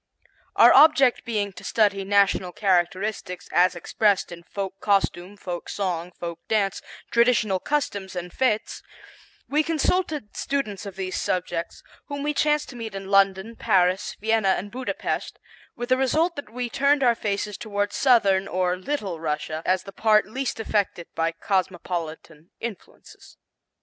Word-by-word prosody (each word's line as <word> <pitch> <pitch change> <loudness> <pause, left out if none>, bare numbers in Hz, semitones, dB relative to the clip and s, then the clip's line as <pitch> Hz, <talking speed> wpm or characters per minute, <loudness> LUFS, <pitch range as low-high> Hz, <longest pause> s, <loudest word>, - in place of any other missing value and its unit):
Our - - +8
object 275 -4 +6
being 205 -4 -2
to - - -12
study 205 -3 +2
national 195 -2 +2
characteristics 185 0 -1
as 180 +1 +4
expressed 200 +3 +1
in 170 0 -8
folk 195 +2 -6
costume, 195 -1 0
folk 175 -3 -6
song, 180 -3 -3
folk 170 -1 -5
dance, 200 -3 0 0.3
traditional 235 -5 +3
customs 200 -9 -2
and 180 0 -5
fêtes, 220 -2 0 0.7
we 300 +2 +2
consulted 310 - -1
students 215 -8 -3
of 195 - -8
these 190 -1 -4
subjects, 175 -2 -3 0.2
whom 285 -1 -5
we 300 0 0
chanced 300 0 +1
to 250 - -10
meet 225 -4 -6
in 195 0 -6
London, 195 +3 +3
Paris, 190 -4 +1
Vienna 220 -3 +2
and 205 +2 -6
Buda 255 +1 -4
Pest, - - -3 0.4
with 240 +1 -5
the 255 - +4
result 315 +7 +1
that 285 -7 -7
we 245 +2 -3
turned 280 +4 +2
our 240 -2 +5
faces 210 -2 -3
toward 205 -1 -2
southern 200 -7 +3
or 180 0 0
"Little" 195 - -3
Russia, 155 0 -3
as 185 0 +2
the 195 - -10
part 215 +1 +3
least 255 +3 -4
affected 205 -5 -1
by 165 0 0
cosmopolitan 170 -3 -3
influences. 225 -5 -10
200 Hz, 150 wpm, -24 LUFS, 185-235 Hz, 0.7 s, Our